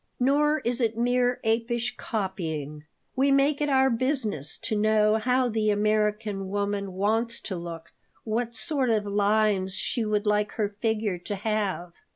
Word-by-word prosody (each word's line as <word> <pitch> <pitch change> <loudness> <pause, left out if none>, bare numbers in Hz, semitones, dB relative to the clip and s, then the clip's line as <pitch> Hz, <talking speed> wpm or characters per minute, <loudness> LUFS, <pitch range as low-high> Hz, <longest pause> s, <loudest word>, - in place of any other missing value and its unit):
Nor 295 +4 +2
is 245 +1 -1
it 225 -1 0
mere 245 +1 +1
apish 235 +2 0
copying. 160 -10 -4 0.3
We 275 +1 +3
make 275 +2 +3
it 295 - +1
our 265 -1 +4
business 230 - 0
to 220 - -2
know 215 0 +3
how 250 +3 +1
the 220 -2 0
American 210 -1 0
woman 200 -1 -2
wants 225 +5 0
to 190 - -5
look, 170 -1 -8 0.3
what 235 +1 -2
sort 270 -1 0
of 215 -2 +1
lines 205 -1 +1
she 235 +4 -1
would 210 0 0
like 210 0 +1
her 210 -2 -1
figure 210 -2 -2
to 190 +4 -4
have. 200 -4 -2
215 Hz, 155 wpm, -26 LUFS, 200-240 Hz, 0.3 s, our